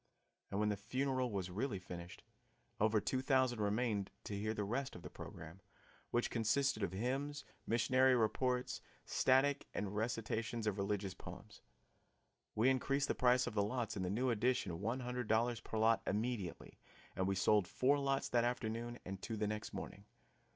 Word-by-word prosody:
And 100 - -2
when 105 0 +2
the 105 - +1
funeral 130 +4 0
was 95 -3 -2
really 110 +3 -1
finished, 90 -1 -8 0.6
over 110 0 +4
two 130 +5 -1
thousand 130 -3 +2
remained 105 -1 0
to 105 - -4
hear 110 +2 -1
the 105 - -1
rest 130 +7 -2
of 85 - -9
the - - -8
program, 85 +4 -9 0.5
which 120 - 0
consisted 115 +2 +2
of 100 - 0
hymns, 135 +8 -2 0.2
missionary 130 +3 +4
reports, 125 +2 +1 0.2
static 135 +2 +3
and 100 0 -2
recitations 115 +1 -1
of 105 -2 0
religious 100 -1 -1
poems. - - -10 0.9
We 110 +4 +4
increased 135 +2 +2
the - - +3
price 125 0 +4
of 125 - -4
the 105 - +2
lots 115 +2 -1
in 100 - -2
the 90 - -1
new 125 +6 +1
addition 105 -6 0
one 115 +5 -1
hundred 125 -1 -3
dollars 115 +2 +2
per 110 - -5
lot 110 +1 +4
immediately, 105 -4 -2 0.4
and 95 - 0
we 95 - +1
sold 100 0 +4
four 140 +7 +3
lots 135 -1 +1
that 120 -1 +3
afternoon 120 0 -2
and 95 +1 -5
two 115 - -4
the 105 - 0
next 105 0 -3
morning. - - -7
115 Hz, 170 wpm, -37 LUFS, 105-125 Hz, 0.9 s, over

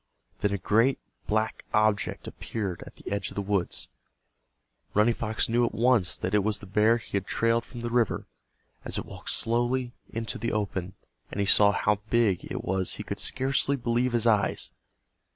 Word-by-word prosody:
Then 105 - +1
a 100 - 0
great 115 +7 +3 0.3
black 110 +1 0
object 105 -1 +1
appeared 100 -6 -4
at - - -12
the - - -9
edge 100 0 -1
of - - -11
the 100 - -1
woods. 100 -2 -1 1.1
Running 110 +3 +5
Fox 110 -1 -1
knew 120 +1 +2
at 120 - 0
once 115 -5 +3
that 95 - -3
it 105 -1 +4
was 110 0 +1
the - - -9
bear 105 +4 +3
he 115 -3 -4
had 95 - -4
trailed 115 0 +2
from 120 0 -9
the 120 0 -3
river. 120 -2 +1 0.6
As - - -3
it - - -3
walked - - -7
slowly 120 +2 +1 0.2
into 115 0 -3
the 115 +2 -1
open 95 -3 -2 0.3
and - - -5
he 100 - +2
saw 100 +1 +6
how 105 0 +1
big 110 -5 +2
it - - -3
was 95 -1 -1
he - - -6
could - - -5
scarcely 135 +1 +2
believe 120 0 0
his 120 -1 +1
eyes. 105 -3 +2
110 Hz, 190 wpm, -27 LUFS, 100-120 Hz, 1.1 s, saw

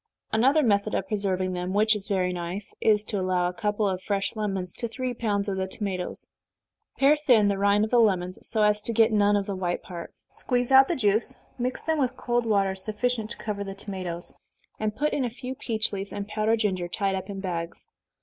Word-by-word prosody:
Another 270 +8 +4
method 205 -4 +2
of 195 - -1
preserving 190 -3 -1
them, 180 +1 -3
which 215 +2 +4
is 205 -1 -5
very 185 -3 0
nice, 180 +3 -4
is 210 -1 +3
to 210 -3 -2
allow 185 -1 +1
a 180 - -3
couple 210 +1 0
of 185 -1 -2
fresh 195 +2 -1
lemons 195 -4 -2
to 235 - -3
three 255 +2 -3
pounds 210 -3 -1
of 195 -1 -2
the 190 0 -1
tomatoes 190 -2 -4 0.7
pare 275 +2 +5
thin 245 -9 +4
the 200 - 0
rind 200 +1 +4
of 220 - -8
the 245 - +5
lemons, 185 -5 +2
so 220 -2 0
as 210 0 +3
to 230 - -1
get 225 +1 +4
none 205 -1 +4
of 200 -1 +1
the 200 - -3
white 180 -2 -2
part, 170 -2 -8 0.2
squeeze 245 0 -1
out 265 0 +8
the 345 - 0
juice, 220 +1 +1 0.2
mix 250 +1 -2
them 320 -1 0
with 260 -3 0
cold 240 -1 0
water 200 -3 +2
sufficient 215 +3 -2
to - - -3
cover 205 -2 -3
the 195 -1 -6
tomatoes, 185 -3 -4 0.5
and 215 -1 -1
put 300 +2 0
in 280 - 0
a 245 - 0
few 250 +2 -6
peach 220 -5 -1
leaves, 195 0 -4
and 200 0 -5
powdered 220 +1 +1
ginger, 185 -5 0
tied 195 +2 -1
up 190 +2 -4
in 195 -1 -5
bags. 170 -3 -4
205 Hz, 220 wpm, -26 LUFS, 190-230 Hz, 0.7 s, out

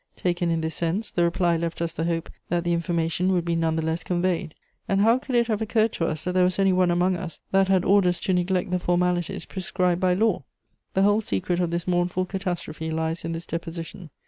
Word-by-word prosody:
Taken 175 -1 0
in 165 -1 0
this 160 0 -2
sense, 175 +6 -1
the 175 - +1
reply 170 0 +2
left 170 0 -3
us 170 -1 -2
the 165 -1 -2
hope 165 -1 -2 0.2
that 175 0 0
the 175 -1 +1
information 170 +1 0
would 175 -2 +1
be 170 -1 0
none 165 -1 +1
the 160 -1 -1
less 160 +1 -1
conveyed. 175 -3 -1 0.3
And 195 0 +2
how 230 +4 +4
could 260 -1 -4
it 235 0 +4
have 220 -2 -1
occurred 220 0 +1
to 165 - -1
us 155 0 -3
that 180 - -1
there 180 0 +3
was 180 0 +1
any 195 -1 +3
one 180 -1 +3
among 175 +2 +2
us 170 -3 -6
that 195 0 +4
had 190 -2 +2
orders 185 -3 +3
to 190 - 0
neglect 180 0 0
the 180 - +1
formalities 180 +1 0
prescribed 180 -2 -1
by 180 -1 +3
law?" 215 -5 +1 0.5
The 190 - +4
whole 205 +2 +4
secret 175 - -1
of 175 -2 +1
this 170 +1 -3
mournful 180 +1 +1
catastrophe 175 -4 -4
lies 160 +1 -2
in 165 0 -3
this 165 0 -5
deposition. 165 +1 -6
175 Hz, 230 wpm, -25 LUFS, 165-185 Hz, 0.5 s, how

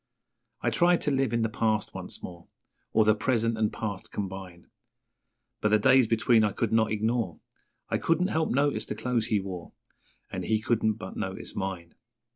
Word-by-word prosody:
I - - +2
tried 175 0 +4
to 150 - 0
live 135 -3 +1
in 115 -1 +1
the - - +2
past 110 -1 0
once - - -7
more 85 -1 -9 0.4
Or 110 - +4
the 110 - +6
present 115 +1 +1
and 110 -1 +1
past 105 -4 -5
combine, 95 -3 -6 1.0
But 105 - +2
the 105 - +5
days 125 +3 +5
between 115 0 +4
I 105 -2 +1
could 115 +1 -1
not 110 -1 +3
ignore 110 -4 -1 0.5
I - - 0
couldn't 175 +3 +1
help 160 -3 0
notice 140 -4 +1
the - - -4
clothes 115 0 -1
he 110 -3 +2
wore, 95 -3 -7 0.6
And - - -4
he 110 -1 +2
couldn't 110 0 +1
but - - -8
notice - - -5
mine. 95 -4 -4
110 Hz, 180 wpm, -28 LUFS, 105-120 Hz, 1.0 s, the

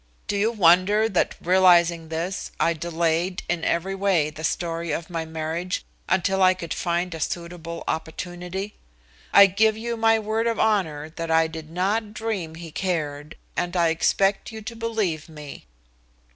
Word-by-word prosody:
Do - - -2
you 210 +3 +2
wonder 200 +2 +4
that 190 -5 0
realizing 175 -2 +4
this 170 +4 -3
I 170 - +3
delayed 170 +2 -1
in 175 -1 -1
every 175 +3 0
way 190 -6 +1
the 155 +1 -9
story 165 0 -2
of 160 +3 -4
my 165 -1 -2
marriage 160 +3 -3 0.2
until 190 +1 +2
I 185 0 +6
could 170 -2 -5
find 175 +1 -1
a 160 - -6
suitable 170 +1 -4
opportunity? 175 +5 -4 0.6
I 200 - +9
give 215 +3 +2
you 235 +1 -3
my 225 0 +4
word 220 +1 -1
of 230 - -1
honor 160 -8 +1
that 165 -1 -3
I 160 0 +4
did 160 -1 -7
not 205 +5 -1
dream 200 -8 -3
he 165 -1 -9
cared, 150 -5 -3 0.2
and 175 +1 -1
I 170 -1 +4
expect 195 +6 +1
you 220 -1 -8
to 230 +2 -7
believe 215 -9 -2
me." 150 -2 -10
175 Hz, 160 wpm, -24 LUFS, 165-200 Hz, 0.6 s, I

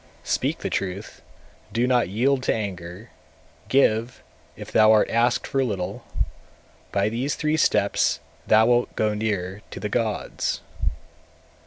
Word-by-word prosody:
224. - - -5
Speak - - 0
the - - -1
truth, 95 +2 -4 0.5
do 115 +4 +1
not 125 -6 +2
yield 130 +7 +2
to - - +1
anger; 95 0 -5 0.6
give, 120 -3 +2 0.3
if - - -9
thou 110 0 +6
art 110 -1 +5
asked 120 +1 +2
for 135 -1 0
little; 100 -5 -3 0.9
by 100 0 +1
these 120 +6 -1
three 155 0 0
steps 105 -9 +2 0.3
thou 110 +1 +6
wilt 120 +1 +2
go 105 -1 +1
near 105 -2 -2
the 105 - -5
gods. 110 -1 -1
110 Hz, 135 wpm, -24 LUFS, 100-120 Hz, 0.9 s, thou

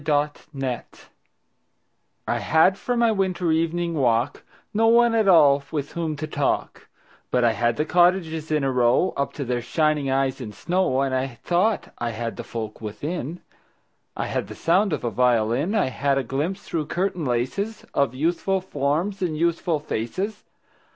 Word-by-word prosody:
Good 150 - -4 0.5
Hours 130 -3 -2 1.5
I - - 0
HAD 160 +4 +4
for 245 -1 -1
my 235 -1 +4
winter 185 -4 0
evening 165 +1 0
walk 125 -2 +1 0.3
No 225 +2 +3
one 235 0 +5
at 220 -3 +2
all 145 -6 +6
with 145 -3 -3
whom 165 -2 -2
to 150 +2 -4
talk, 145 -3 -2 0.4
But 125 - +1
I 120 - +5
had 120 +2 0
the 150 - +1
cottages 170 -2 +2
in 155 -2 +1
a 135 - +1
row 125 +7 +3
Up 140 - -1
to 140 - -4
their 120 0 -1
shining 150 +2 +1
eyes 135 0 0
in 105 -4 -6
snow. 175 - 0
And 135 -1 0
I 130 -2 -2
thought 190 +5 +1
I 120 - -1
had 115 0 -4
the - - -5
folk 110 -2 -6
within: 145 +9 -5 0.8
I - - -1
had - - -2
the - - -9
sound 190 +4 +2
of 150 - -2
a 120 - -1
violin; 125 - +2
I 200 -11 +2
had 140 +1 0
a 135 - 0
glimpse 150 - -3
through 155 -3 -3
curtain 180 0 -1
laces 140 - -2
Of 140 -3 +1
youthful 175 +6 0
forms 180 +3 -1
and 165 -4 -1
youthful 170 0 +1
faces. 170 - -4
155 Hz, 170 wpm, -24 LUFS, 130-180 Hz, 1.5 s, all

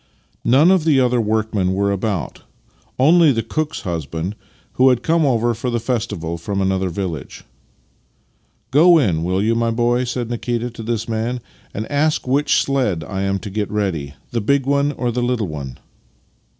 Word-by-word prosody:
None 145 +9 +5
of 190 -4 +3
the 150 -4 +3
other 125 -2 +2
workmen 110 -3 0
were 100 +1 +1
about 100 -3 -3 0.3
— - - -38 0.3
only 160 +3 +6
the 115 -3 -1
cook's 155 +7 -3
husband, 85 +2 -4 0.4
who 130 +1 +5
had 125 -2 +1
come 165 -2 +2
over 120 -2 +2
for 120 +3 -3
the 120 -1 0
festival 105 -9 -3
from 100 +4 -3
another 95 -1 0
village. 85 -4 -5 0.6
" 115 - -42
Go 165 +5 +6
in, 90 - +1
will 90 +2 0
3' 110 +2 +2
ou, - - +3
my 115 0 +1
boy," 120 +2 +1
said 120 -1 -3
Nikita 120 0 -2
to 115 - -9
this 115 0 -3
man, 115 +2 -2 0.2
" - - -31
and 105 - -3
ask 150 -1 +1
which 140 +3 +2
sledge 125 - 0
1 - - -11
am 100 0 0
to 100 0 -7
get 105 0 -2
ready 85 -9 -2
— - - -36
the 115 - -1
big 140 +5 +1
one 140 +1 +2
or 125 -3 -2
the 120 +1 -2
httle 120 -4 0
one? 70 -5 -7
115 Hz, 190 wpm, -20 LUFS, 100-130 Hz, 0.6 s, only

